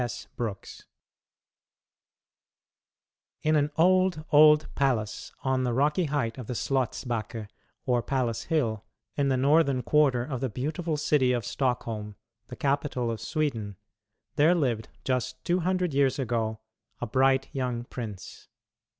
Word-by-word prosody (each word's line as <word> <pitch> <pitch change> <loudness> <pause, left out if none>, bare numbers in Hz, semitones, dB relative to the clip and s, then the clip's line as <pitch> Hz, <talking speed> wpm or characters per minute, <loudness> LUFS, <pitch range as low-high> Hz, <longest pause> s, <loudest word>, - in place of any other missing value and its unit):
S. 120 -3 -5
Brooks 110 -5 -6 2.6
In 155 0 +3
an 145 -1 +2
old, 185 -2 +3
old 150 +1 +7
palace 125 -6 -1
on 130 -1 +1
the 125 -1 0
rocky 150 +6 +2
height 140 -5 -2
of 120 - -7
the 125 - -4
Slottsbacke, 115 -3 -2 0.4
or 125 -2 +2
Palace 115 -3 -1
Hill, 115 -10 0 0.3
in 140 -1 +1
the 130 - +2
northern 140 -1 +3
quarter 135 -3 +3
of 130 -3 -4
the 130 - -1
beautiful 155 +7 -2
city 145 -4 +2
of 120 -4 -2
Stockholm, 115 -5 -2 0.3
the - - -8
capital 140 -4 -1
of 115 - -5
Sweden, 115 - -2 0.6
there 160 +5 +5
lived, 120 -9 -1
just 130 0 -2
two 175 +1 +2
hundred 180 -2 0
years 135 -2 +2
ago, 115 -4 -2 0.4
a - - -2
bright 130 +3 +2
young 125 -3 -2
prince. 110 -6 -8
130 Hz, 135 wpm, -27 LUFS, 120-150 Hz, 2.6 s, old